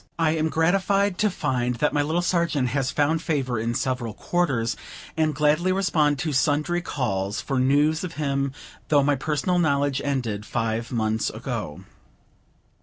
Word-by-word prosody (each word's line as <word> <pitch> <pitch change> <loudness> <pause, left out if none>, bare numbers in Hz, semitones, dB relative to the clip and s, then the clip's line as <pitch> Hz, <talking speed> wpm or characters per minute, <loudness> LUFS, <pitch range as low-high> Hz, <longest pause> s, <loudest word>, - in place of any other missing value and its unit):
I 165 -2 +2
am 160 0 0
gratified 195 +4 +1
to 210 - +3
find 125 -8 -1
that 150 +5 0
my 145 - +2
little 160 +4 0
Sergeant 170 -8 +1
has 130 0 0
found 155 +3 +1
favor 135 -8 -1
in 115 +1 -2
several 125 -4 -2
quarters, 135 -10 0 0.4
and 155 -2 +1
gladly 155 +5 +2
respond 160 -6 +2
to 155 +2 -2
sundry 150 +5 +1
calls 100 - -2
for 135 -2 -1
news 145 +5 +2
of 175 -2 -5
him, 140 -2 -1 0.4
though 145 -2 +4
my 145 +1 +3
personal 150 +6 0
knowledge 140 -4 +1
ended 120 -7 -2
five 115 +2 -2
months 110 -2 0
ago. 75 - -5
145 Hz, 155 wpm, -24 LUFS, 125-160 Hz, 0.4 s, though